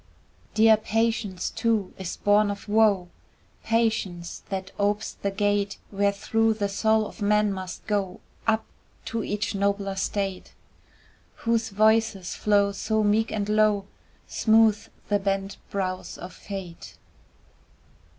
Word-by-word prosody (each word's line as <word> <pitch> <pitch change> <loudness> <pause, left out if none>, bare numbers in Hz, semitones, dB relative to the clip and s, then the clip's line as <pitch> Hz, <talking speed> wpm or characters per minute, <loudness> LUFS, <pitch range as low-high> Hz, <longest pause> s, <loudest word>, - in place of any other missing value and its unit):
Dear 220 0 +6
Patience, 215 -4 -1
too, 220 -5 0
is 185 -2 -5
born 205 0 +3
of 200 +1 -6
woe, 205 -4 +3 0.5
Patience 220 -7 -1
that 190 -1 -4
opes 205 +1 0
the 200 - -3
gate 205 0 0
Wherethrough 205 +3 +1
the 200 -2 -1
soul 220 +2 +2
of - - -10
man 210 0 +3
must 185 -1 -7
go 200 -3 -1 0.3
Up 220 0 +2 0.4
to 230 -1 -2
each 210 +1 -2
nobler 200 0 0
state, 195 0 -3 0.9
Whose 230 -1 +1
voice's 215 -2 +2
flow 200 -1 +2
so 215 +2 0
meek 215 +2 +2
and 205 -2 -2
low 210 -1 +3 0.4
Smooths 220 -1 +3 0.2
the 205 -1 +2
bent 195 0 -2
brows 185 -2 -3
of 180 +1 -9
Fate. 190 -4 -8
205 Hz, 120 wpm, -26 LUFS, 195-220 Hz, 0.9 s, Dear